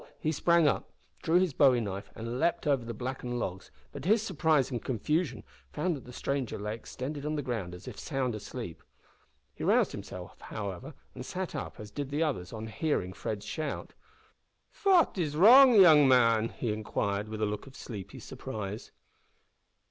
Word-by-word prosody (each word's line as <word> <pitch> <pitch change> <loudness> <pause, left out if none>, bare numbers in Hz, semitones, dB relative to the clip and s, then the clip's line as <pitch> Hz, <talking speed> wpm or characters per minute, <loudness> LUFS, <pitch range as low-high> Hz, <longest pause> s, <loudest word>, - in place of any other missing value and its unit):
he 155 - 0
sprang 170 +1 +3
up, - - 0 0.3
drew 165 +2 +3
his 185 -5 +1
bowie 130 -3 +5
knife, 100 -3 -5
and 115 +2 -4
leaped 170 - +1
over 140 -4 +2
the 115 - -5
blackened 125 +1 -4
logs, 95 -5 -4 0.2
but, 140 - -7
to 170 - -2
his 220 0 +4
surprise 160 - +2
and 120 -3 -3
confusion, 130 - -1 0.3
found 175 - -1
that 135 - -10
the 125 - -10
stranger 135 -1 -2
lay 105 +1 -3
extended 135 +5 -6
on 150 +1 -2
the 145 - -2
ground 110 -9 -3
as 90 - -13
if - - -8
sound 135 -5 -2
asleep. 105 -3 -7 0.7
He - - -8
roused - - +3
himself, - - -9
however, 100 -4 -6 0.2
and - - -7
sat - - -4
up, - - -6
as 105 -1 -9
did 140 +1 -4
the 145 +3 0
others, 95 - -2
on 110 -1 -6
hearing 110 - -1
Fred's 105 +2 -5
shout. 155 -3 -4 0.8
"Fat 370 - +3
is 150 -4 -1
wrong, 245 - +8
yoong 160 -8 +8
man?" 115 -3 +4
he 115 -4 -3
inquired, 105 -1 -2
with 110 0 -5
a - - +4
look 105 +5 -4
of 135 - -13
sleepy 105 -6 -8
surprise. 105 0 -6
130 Hz, 180 wpm, -30 LUFS, 110-155 Hz, 0.8 s, wrong